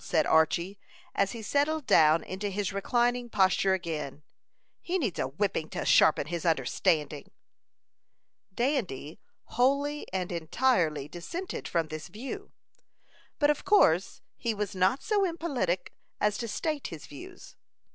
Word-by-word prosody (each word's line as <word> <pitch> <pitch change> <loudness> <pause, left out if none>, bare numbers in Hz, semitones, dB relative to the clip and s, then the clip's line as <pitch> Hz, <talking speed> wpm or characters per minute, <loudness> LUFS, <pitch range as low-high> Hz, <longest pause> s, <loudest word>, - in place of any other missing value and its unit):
said 155 -3 +1
Archy, 170 +5 +2 0.3
as 200 +3 +1
he 230 -2 -7
settled 290 +5 0
down 155 -6 +5
into 195 +2 -4
his 200 -1 -2
reclining 240 +4 0
posture 190 -1 +3
again. 155 -5 -5 0.6
"He 360 +2 -1
needs 235 - -2
a - - 0
whipping 160 +2 -2
to - - -4
sharpen 150 - +5
his 170 +2 -4
understanding." 155 0 0 1.2
Dandy 190 - -2 0.2
wholly 280 +4 0
and 185 -1 -2
entirely 165 - +1
dissented 335 - -6
from 165 -2 -1
this 155 -1 -6
view; 265 - -7 0.9
but 295 -1 +4
of 295 - -4
course 190 - +3
he 230 -2 -2
was 210 -1 -3
not 190 +9 +1
so 420 -2 +2
impolitic 290 - -1 0.3
as 210 0 +2
to 235 - -3
state 305 +5 -2
his 160 -3 -9
views. 145 - -12
195 Hz, 135 wpm, -29 LUFS, 165-260 Hz, 1.2 s, down